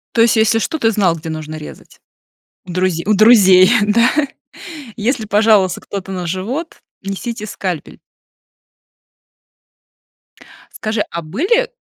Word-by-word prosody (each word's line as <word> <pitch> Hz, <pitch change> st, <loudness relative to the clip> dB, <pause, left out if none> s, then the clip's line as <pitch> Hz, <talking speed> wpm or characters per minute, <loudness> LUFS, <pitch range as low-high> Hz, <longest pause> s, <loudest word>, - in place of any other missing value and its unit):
То 230 Hz, -, +4 dB
есть 230 Hz, 0 st, +4 dB
если 225 Hz, 0 st, +2 dB
что, 270 Hz, +9 st, -2 dB
ты 225 Hz, -6 st, +1 dB
знал, 195 Hz, -6 st, +1 dB
где 160 Hz, 0 st, -8 dB
нужно 155 Hz, 0 st, -6 dB
резать? 155 Hz, -1 st, -12 dB, 0.7 s
У 180 Hz, -, -8 dB
друзе 180 Hz, -2 st, -1 dB
у 215 Hz, -, +3 dB
друзей, 195 Hz, -3 st, +6 dB
да? 225 Hz, +4 st, +3 dB, 0.9 s
Если 230 Hz, +1 st, -2 dB
пожаловался 210 Hz, -3 st, +2 dB
кто-то 195 Hz, -1 st, -7 dB
на 180 Hz, -2 st, -4 dB
живот, 225 Hz, -, -5 dB, 0.2 s
несите 210 Hz, +3 st, -5 dB
скальпель. 185 Hz, -6 st, -6 dB, 2.7 s
Скажи, 215 Hz, -1 st, -2 dB
а 170 Hz, -, -4 dB
были 360 Hz, -, 0 dB
205 Hz, 120 wpm, -16 LUFS, 185-225 Hz, 2.7 s, друзей